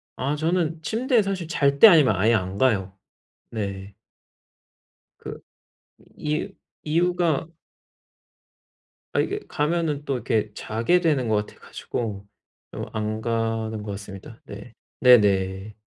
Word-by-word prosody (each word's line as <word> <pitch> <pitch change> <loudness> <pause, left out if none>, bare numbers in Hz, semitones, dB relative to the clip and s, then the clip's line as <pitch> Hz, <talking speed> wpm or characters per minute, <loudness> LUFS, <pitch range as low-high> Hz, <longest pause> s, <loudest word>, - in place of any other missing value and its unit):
아 140 +3 -2
저는 160 0 -1
침대에 235 +2 +1
사실 195 -4 -3
잘 140 -4 +1
때 225 - +11
아니면 150 - +5
아예 105 +6 +3
안 95 -1 -3
가요. 100 -6 +1 0.6
네. 100 -2 -5 1.2
그 - - -8 0.8
이 150 +1 -2 0.3
이유가 170 -1 +1 1.6
아 - - 0
이게 410 - -1
가면은 150 -1 -1
또 140 - -1
이렇게 110 -3 -1
자게 115 +12 +1
되는 145 -8 +1
것 105 -1 +1
같아 - - -18
가지고 105 -4 -6 0.5
좀 - - -6
안 110 0 -3
가는 115 -1 -2
것 105 - -6
같습니다. 100 -1 -10
네. - - -11 0.3
네네. 100 -4 +3
120 Hz, 210 characters per minute, -24 LUFS, 105-160 Hz, 1.6 s, 때